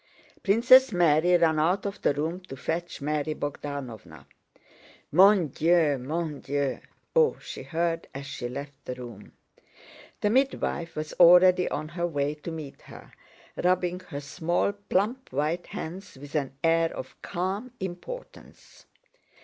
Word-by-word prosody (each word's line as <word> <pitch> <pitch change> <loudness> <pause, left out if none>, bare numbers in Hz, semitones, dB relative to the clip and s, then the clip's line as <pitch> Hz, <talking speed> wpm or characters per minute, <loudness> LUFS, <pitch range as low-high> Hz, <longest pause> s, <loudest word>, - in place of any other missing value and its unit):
Princess 250 +5 +6
Mary 175 -1 +4
ran 160 -2 +3
out 180 +6 +1
of 200 0 -4
the - - +3
room 160 +5 -2
to 180 -8 -10
fetch 170 +5 -4
Mary 150 +1 -1
Bogdánovna. 140 -6 -6 0.9
"Mon 185 0 +6
Dieu! 160 -1 +2
Mon 155 +2 -3
Dieu! 140 -2 -2 0.4
Oh!" 470 -1 +4
she - - -8
heard 165 0 -2
as 135 +1 -7
she 120 -3 -5
left 140 +3 -6
the 125 - -5
room. 120 -5 -10 0.9
The 210 - +2
midwife 250 -9 0
was 155 0 -4
already 180 +1 +7
on 155 +1 -4
her 175 +1 -2
way 145 -3 -1
to 150 +2 -8
meet 155 -4 -8
her, - - -13 0.4
rubbing 180 0 +1
her 145 -3 -6
small, 170 +6 0
plump 205 +5 -2
white 150 +6 -1
hands 180 -1 -7
with 145 +2 -11
an 140 -3 -2
air 165 0 +3
of 130 - -8
calm 195 +7 -3
importance. 190 - -9
165 Hz, 140 wpm, -27 LUFS, 145-185 Hz, 0.9 s, already